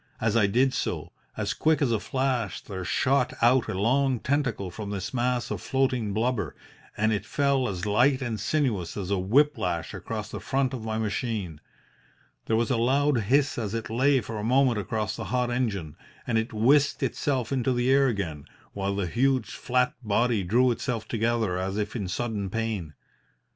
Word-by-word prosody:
As 110 0 +1
I 110 -4 +4
did 125 +6 +2
so, - - -3 0.3
as - - -1
quick 160 0 +2
as 135 -5 +1
a 110 - +1
flash 130 -7 -1
there 95 -2 -7
shot 130 +7 +1
out 120 +1 +4
a - - -3
long 130 +3 +2
tentacle 125 -9 -1
from 105 +2 -6
this 100 +1 -4
mass 125 -1 0
of - - -3
floating 130 -5 0
blubber, 115 +3 -1 0.4
and 110 +1 +2
it 105 -2 -1
fell 140 +1 +1
as 90 -1 -4
light 125 +6 +3
and 120 -5 -3
sinuous 105 - -1
as 100 -1 -4
a 100 - +1
whip 135 +8 +3
lash 85 -4 -2
across - - -5
the - - -5
front 135 -1 0
of 120 -4 -5
my 110 0 -2
machine. 105 - -3 0.9
There 110 - +2
was 115 +1 +1
a 125 - +2
loud 135 +3 +2
hiss 140 +3 +2
as 110 -1 -3
it 115 -1 -4
lay 130 +3 +3
for 110 -1 -6
a - - -4
moment 125 -1 +3
across 105 +2 -2
the - - -5
hot 125 -1 0
engine, 100 - -2 0.3
and 115 -2 +1
it 110 - -3
whisked 135 +7 +3
itself 130 -1 -1
into 130 -1 +1
the 125 +1 +1
air 135 0 +5
again, 85 - -3 0.3
while 100 0 -2
the 100 -2 -1
huge 130 +8 +1
flat 125 0 0
body 110 0 +1
drew 120 +7 +3
itself 120 -1 -3
together 115 -5 0
as 95 +2 -2
if 105 +1 -2
in 100 -6 -2
sudden 105 0 -2
pain. 105 -8 -3
115 Hz, 190 wpm, -27 LUFS, 105-130 Hz, 0.9 s, air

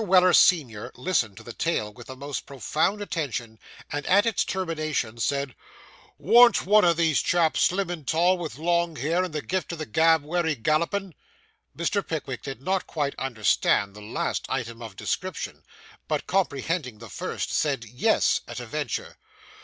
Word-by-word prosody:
Weller, 185 -2 +5
senior, 130 - +3
listened 125 - 0
to - - -11
the 120 - -8
tale 110 -11 -1
with 120 +1 -13
the 130 - -8
most 140 +1 -5
profound 155 - -1
attention, 120 - -4 0.3
and, 145 -1 -2
at 200 +4 +5
its 230 -4 +1
termination, 155 - -2
said 140 +1 -1 0.6
'Worn't 230 +9 +6
one 210 +2 +5
o' 175 - +6
these 160 -4 +2
chaps 170 -2 +2
slim 185 -1 +1
and 160 -6 -7
tall, 175 +3 +3
with 165 -3 -5
long 170 +1 +1
hair, 165 +6 0
and 185 - -4
the 150 -1 -4
gift 185 -1 -2
o' - - -3
the 155 -1 -5
gab 160 +4 +3
wery 160 0 0
gallopin'?' 170 - 0 0.6
Mr. 170 +5 0
Pickwick 140 -6 -4
did 135 -1 -7
not 190 +4 0
quite 145 -3 -2
understand 105 -4 +1
the 105 - -10
last 105 +2 -3
item 115 -3 -3
of 110 -4 -8
description, 185 - -4 0.5
but, - - -1
comprehending 160 - -1
the 115 +1 -11
first, - - -4
said 140 -6 0
'Yes,' 125 - +2
at 120 0 -6
a 120 - -6
venture. 145 +1 -4
155 Hz, 170 wpm, -26 LUFS, 125-175 Hz, 0.6 s, Worn't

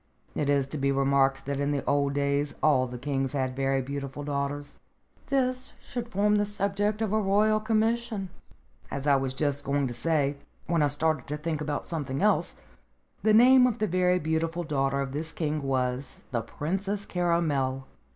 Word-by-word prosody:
It 145 - -1
is 140 -2 +3
to 150 - -5
be 140 0 +2
remarked 135 0 +2
that 140 0 -2
in 140 0 0
the 145 -1 -1
old 140 0 +1
days 140 +1 0
all 130 -4 +4
the 125 0 -7
kings 135 +1 -2
had 130 -2 -1
very 135 0 +1
beautiful 140 +1 -5
daughters. 145 0 -3 0.5
This 255 -1 0
should 240 -2 -6
form 210 +1 +2
the 205 - +2
subject 205 +1 0
of 215 -2 -1
a 215 - +3
Royal 210 +2 +3
Commission. 220 -2 0 0.6
As 140 - -4
I 145 -1 +5
was 135 -1 -1
just 145 0 0
going 140 0 0
to 125 - -3
say, 145 +2 0 0.3
when 170 -1 +1
I 145 - +4
started 150 -1 0
to 150 - -3
think 155 0 -3
about 150 -1 -3
something 140 -5 -3
else, 210 +1 +2 0.7
the 220 - +3
name 250 +2 +7
of 240 -2 -1
the 215 - +1
very 180 -1 +2
beautiful 165 +1 -1
daughter 140 -3 0
of 135 -1 -3
this 155 +3 -4
king 155 -2 -2
was 130 -1 -1 0.2
the 120 -2 0
Princess 195 - -3
Caramel. 150 -7 0
145 Hz, 180 wpm, -27 LUFS, 140-195 Hz, 0.7 s, name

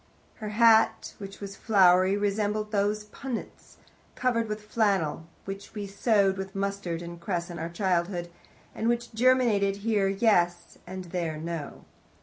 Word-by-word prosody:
Her 215 -2 -5
hat, 225 +1 +4
which 195 -1 -8
was 200 -1 -7
flowery, 190 -2 +4
resembled 210 +1 -1
those 210 0 0
punnets, 235 +3 -7 0.4
covered 230 -3 +1
with 210 0 -4
flannel, 195 -8 0 0.2
which 195 +2 -8
we 205 -1 -4
sowed 200 -1 +2
with 190 0 -6
mustard 195 -4 -3
and 170 0 -9
cress 175 -1 -3
in 170 - -7
our 165 +1 -3
childhood, 175 -1 -1 0.4
and 225 - -2
which 240 0 -1
germinated 225 -5 +3
here 210 -4 +2
yes, 175 -4 +1
and 185 0 -6
there 170 -4 -2
no. 160 -2 -6
200 Hz, 140 wpm, -27 LUFS, 175-215 Hz, 0.4 s, hat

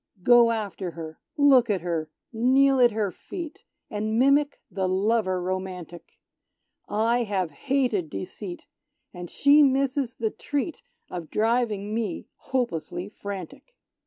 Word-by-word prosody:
Go 240 +1 +7
after 205 -5 -3
her, 160 -1 -8 0.2
look 270 -5 +5
at 195 -4 +1
her, 165 -3 -2 0.2
kneel 265 +4 +4
at 245 -1 +7
her 210 -3 -1
feet, 325 - -8 0.2
And 215 +1 -2
mimic 280 +3 +3
the 190 -2 -1
lover 190 0 +1
romantic; 180 -2 -5 0.7
I 230 +3 +2
have 195 -7 -1
hated 245 - 0
deceit, 175 - -7 0.5
and 175 -1 -7
she 285 +2 +5
misses 270 -2 +2
the 220 -1 -1
treat 290 +2 -3 0.3
Of 175 -3 -6
driving 215 -2 0
me 220 -6 -2
hopelessly 185 -7 -3
frantic! 200 - -8
215 Hz, 125 wpm, -26 LUFS, 185-255 Hz, 0.7 s, Go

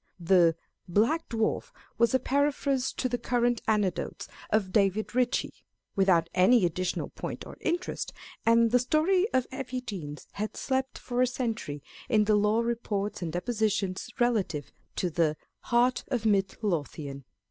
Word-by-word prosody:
The 170 -1 +4 0.3
Black 225 - +1
Dzcar/was 230 +1 -1
a - - +4
paraphrase 275 -1 0
of 255 - +1
the 245 - 0
current 240 -1 +1
anecdotes 205 -5 0 0.2
of 205 -3 +1
David 200 +2 +1
Ritchie, 250 0 +1 0.4
without 190 -4 +4
any 190 +3 +5
additional 180 +2 -2
point - - -6
or - - -9
interest, 350 +1 -2 0.3
and 230 0 +4
the 250 - +5
story 335 - +2
of 255 -1 +2
Effie 260 -1 -4
Deans 170 -11 -7
had 215 +1 -4
slept 265 0 -1
for 245 0 -2
a 255 - +4
century 225 - -3 0.3
in 215 -4 +4
the 215 +1 +2
law 210 +2 +3
reports 215 -4 -2
and 170 -2 -3
depositions 210 +1 -1
relative 210 -11 0 0.2
to 180 - -1
the 155 -2 +1 0.3
Heart 245 +1 +2
of 240 -4 -2
Mid 195 -3 +2
Lothian. 145 -6 -3
220 Hz, 145 wpm, -28 LUFS, 185-250 Hz, 0.4 s, any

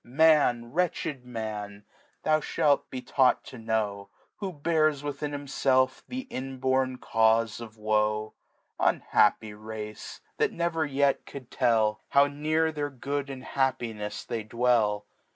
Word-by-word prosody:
Man, 130 -4 +3
wretched 155 -6 -1
Man, 105 -3 -5 0.4
thou 155 0 +3
ihalt 145 -2 +1
be 130 -1 -6
taueht 130 -2 +3
toknovir^ 110 -4 -3 0.3
Who 195 -2 -4
bears 155 -2 +1
within 145 0 -3
himfclf 135 -2 +1
the 255 +1 -4
inborn 130 - -1
Caufe 115 -1 +2
of 115 -1 -10
Woe. 105 0 0 0.5
Unhappy 105 0 +2
Race! 105 0 -8 0.2
that - - +2
never 165 -2 -1
yet 140 0 +1
could 130 -3 -10
tell. 110 -4 +2
How 140 0 +6
near 155 +3 0
their 145 -2 -3
Good 140 +1 -4
and 130 -2 -7
Happinefs 115 -6 -2
they 115 - -3
dwell. 110 -2 +1
130 Hz, 125 wpm, -28 LUFS, 110-145 Hz, 0.5 s, How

